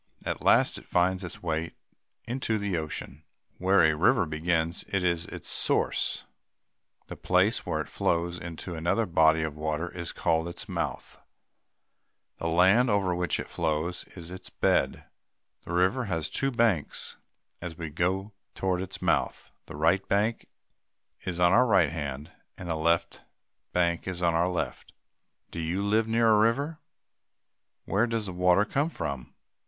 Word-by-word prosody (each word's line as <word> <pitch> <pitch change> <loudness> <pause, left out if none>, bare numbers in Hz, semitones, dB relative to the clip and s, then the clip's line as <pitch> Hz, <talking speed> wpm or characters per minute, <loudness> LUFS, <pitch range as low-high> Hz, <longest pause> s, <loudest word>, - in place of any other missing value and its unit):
At - - -3
last, - - +4
it - - -18
finds 90 +2 +1
its 90 0 -8
way 80 -1 -2 0.5
into 120 -2 -1
the 100 -3 -2
ocean. 75 -2 -5 0.4
Where 95 0 +4
a 80 -1 +5
river 85 +3 +3
begins 80 +2 -1
is 90 -3 0
its - - -8
source. - - +1 0.8
The - - -8
place - - +1
where - - 0
it - - -6
flows 85 +1 -1
into 85 +1 -7
another 85 +7 0
body 80 -3 +4
of 80 -2 -3
water 80 +2 -2
is 85 -2 -4
called 80 0 0
its 85 - -7
mouth. - - -4 1.2
The 85 - -2
land 95 +9 +4
over 100 -3 +2
which 90 0 -1
it - - -3
flows 80 +2 -2
is 85 -1 -8
its 95 - -9
bed. - - +1 0.6
A - - -5
river 95 +9 +2
has 80 -6 -2
two 135 - 0
banks. 115 - 0 0.4
As 85 -2 -6
we 80 -3 -5
go 95 +6 -1 0.2
toward 95 -1 0
its 95 - -7
mouth, - - 0 0.2
the - - -8
right 85 +6 +2
bank 105 +3 +1 0.8
is 90 -1 -3
on 90 +1 +5
our 125 +2 +5
right 95 -8 +4
hand, 75 -2 -5 0.3
and 90 - -7
the - - 0
left 85 +1 0 0.5
bank 85 -1 0
is 90 -1 -3
on 85 -1 +3
our 85 +2 +2
left. 90 - -4 0.6
Do - - -6
you 85 +4 -1
live 110 +2 +2
near 115 0 +3
a 105 - +5
river? 140 +9 +1 1.1
Where 105 +5 +2
does 115 -2 -2
the 95 - -5
water 90 +3 +4
come 145 +8 0
from? 70 - -5
90 Hz, 160 wpm, -28 LUFS, 80-100 Hz, 1.2 s, a